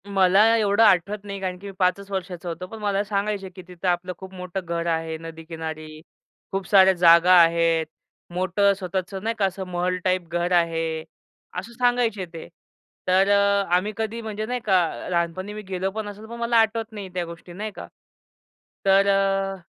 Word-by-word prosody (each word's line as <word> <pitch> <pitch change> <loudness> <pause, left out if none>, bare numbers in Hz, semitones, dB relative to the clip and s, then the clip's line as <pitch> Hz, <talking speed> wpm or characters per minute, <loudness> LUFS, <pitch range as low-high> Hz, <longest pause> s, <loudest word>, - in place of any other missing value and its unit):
मला 195 0 +4
एवढं 210 0 +3
आठवत 200 0 +3
नाही. 200 -1 -6
कारण 185 -1 -3
की 200 - -9
मी - - -6
5 185 +1 +2
वर्षाचा 180 -2 -4
होतो. 170 +2 -6
पण 225 +3 -9
मला 205 -1 0
सांगायचे, 200 -1 -2
की 185 0 -12
तिथं 180 +1 -6
आपलं 180 +1 0
खूप 190 0 -11
मोठं 180 0 -6
घर 170 0 -2
आहे 160 0 -2
नदीकिनारी. 160 -1 -8 0.5
खूप 195 -1 -3
साऱ्या 190 -1 +6
जागा 170 0 +6
आहेत. 165 -1 +3 0.5
मोठं 185 +3 +2
स्वतःचं 190 0 -4
नाही 225 +1 -1
का 200 - +3
असं 190 0 -3
महल 180 0 -1
टाईप 185 -2 0
घर 175 +1 -1
आहे, 165 -2 +1 0.6
असं 190 +6 -9
सांगायचे 240 -5 +1
ते. 165 - -8 0.6
तर 190 +2 +4
अ, 200 0 +3
आम्ही 195 +4 0
कधी 225 +1 -3
म्हणजे 215 -1 -4
नाही 250 +2 -2
का, 185 -5 +1
लहानपणी 180 +3 -2
मी 215 - -6
गेलो 190 +1 -2
पण 215 +1 -5
असेल, 205 +2 -10
पण 235 +1 -9
मला 235 0 +2
आठवत 225 0 +1
नाही 205 -3 -7
त्या 180 -1 -2
गोष्टी 170 +1 -11
नाही 210 +4 -5
का. - - -8 1.0
तर 195 +1 +5
अ 195 0 +1
190 Hz, 180 wpm, -24 LUFS, 175-205 Hz, 1.0 s, साऱ्या